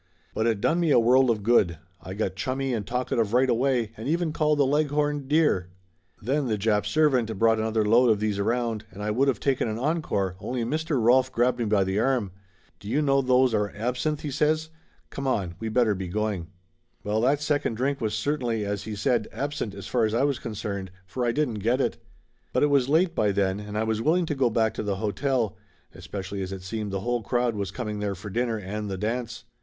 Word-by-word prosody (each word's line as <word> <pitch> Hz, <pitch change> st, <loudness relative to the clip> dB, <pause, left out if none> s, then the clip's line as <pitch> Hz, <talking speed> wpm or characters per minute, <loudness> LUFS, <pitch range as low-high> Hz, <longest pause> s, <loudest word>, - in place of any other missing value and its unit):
But 110 Hz, -, 0 dB
it 110 Hz, -3 st, 0 dB
done 170 Hz, +1 st, +2 dB
me 170 Hz, -2 st, +2 dB
a 145 Hz, -, +5 dB
world 125 Hz, +2 st, +4 dB
of 110 Hz, -3 st, 0 dB
good. 100 Hz, -7 st, +3 dB, 0.2 s
I 95 Hz, -, -7 dB
got 100 Hz, -3 st, -2 dB
chummy 130 Hz, +6 st, -2 dB
and 105 Hz, -4 st, -3 dB
talkative 120 Hz, -3 st, -1 dB
right 130 Hz, +2 st, +4 dB
away 120 Hz, -2 st, +1 dB
and 110 Hz, -, -7 dB
even 165 Hz, -1 st, 0 dB
called 150 Hz, -2 st, +2 dB
the 140 Hz, -, +4 dB
Leghorn, 145 Hz, 0 st, 0 dB
dear. 145 Hz, -, +2 dB, 0.5 s
Then 135 Hz, +5 st, -1 dB
the 110 Hz, -2 st, 0 dB
Jap 105 Hz, 0 st, +1 dB
servant 125 Hz, -6 st, +2 dB
brought 115 Hz, +1 st, +3 dB
another 110 Hz, 0 st, 0 dB
load 120 Hz, +3 st, +5 dB
of 110 Hz, -2 st, +3 dB
these 105 Hz, -1 st, -1 dB
around, 115 Hz, 0 st, -1 dB
and 100 Hz, +2 st, -8 dB
I 105 Hz, -, -1 dB
would 135 Hz, +6 st, +2 dB
of 125 Hz, -, -1 dB
taken 135 Hz, -3 st, 0 dB
an 110 Hz, 0 st, -3 dB
encore 120 Hz, -, -1 dB
only 125 Hz, +1 st, -3 dB
Mr. 155 Hz, +3 st, -1 dB
Rolf 130 Hz, +3 st, +4 dB
grabbed 125 Hz, +1 st, +1 dB
me 120 Hz, -, 0 dB
by 105 Hz, -2 st, +3 dB
the 95 Hz, +2 st, -1 dB
arm. 120 Hz, -5 st, +1 dB, 0.5 s
"Do 100 Hz, -, -11 dB
you 150 Hz, +6 st, +1 dB
know 135 Hz, -1 st, +3 dB
those 130 Hz, -1 st, +3 dB
are 105 Hz, -1 st, 0 dB
absinth?" 125 Hz, +7 st, -1 dB
he 150 Hz, -, -4 dB
says. 155 Hz, +3 st, +1 dB, 0.4 s
"Come 135 Hz, 0 st, -4 dB
on, 95 Hz, -9 st, 0 dB
we'd 110 Hz, -1 st, -4 dB
better 120 Hz, -4 st, +4 dB
be 95 Hz, -1 st, -5 dB
going." 100 Hz, -2 st, -2 dB, 0.6 s
Well, 105 Hz, +2 st, 0 dB
that 135 Hz, +4 st, +3 dB
second 145 Hz, -5 st, 0 dB
drink 135 Hz, +3 st, -1 dB
was, 110 Hz, -2 st, -1 dB
certainly, 120 Hz, -7 st, -1 dB
as 100 Hz, 0 st, -3 dB
he 110 Hz, -, -5 dB
said, 115 Hz, 0 st, +1 dB
absent 140 Hz, -8 st, -4 dB
as 100 Hz, -1 st, -8 dB
far 120 Hz, +1 st, 0 dB
as 110 Hz, 0 st, +1 dB
I 125 Hz, -, +2 dB
was 140 Hz, -2 st, +1 dB
concerned, 100 Hz, -4 st, -5 dB, 0.2 s
for 125 Hz, +7 st, -4 dB
I 120 Hz, -, +2 dB
didn't 120 Hz, -5 st, -1 dB
get 120 Hz, +6 st, +1 dB
it. -, -, 0 dB, 0.6 s
But -, -, +2 dB
it 145 Hz, -, +3 dB
was 135 Hz, -2 st, +3 dB
late 165 Hz, +3 st, +3 dB
by 105 Hz, -9 st, +2 dB
then 95 Hz, 0 st, 0 dB
and 105 Hz, 0 st, -6 dB
I 110 Hz, -, +1 dB
was 110 Hz, 0 st, -1 dB
willing 170 Hz, +6 st, +2 dB
to 160 Hz, -, -2 dB
go 135 Hz, -3 st, +2 dB
back 110 Hz, -1 st, +1 dB
to -, -, -4 dB
the 100 Hz, -2 st, -1 dB
hotel, 110 Hz, +3 st, -1 dB, 0.4 s
especially 100 Hz, 0 st, -6 dB
as 95 Hz, 0 st, -4 dB
it 95 Hz, -1 st, -6 dB
seemed 105 Hz, +2 st, -4 dB
the 95 Hz, 0 st, -2 dB
whole 120 Hz, +2 st, -1 dB
crowd 120 Hz, +3 st, 0 dB
was 100 Hz, -3 st, -3 dB
coming 105 Hz, 0 st, -4 dB
there 100 Hz, -1 st, -2 dB
for 100 Hz, +3 st, -8 dB
dinner 115 Hz, +1 st, 0 dB
and 105 Hz, +1 st, -5 dB
the 95 Hz, -, -3 dB
dance. 115 Hz, +3 st, -3 dB
115 Hz, 225 wpm, -26 LUFS, 105-135 Hz, 0.6 s, a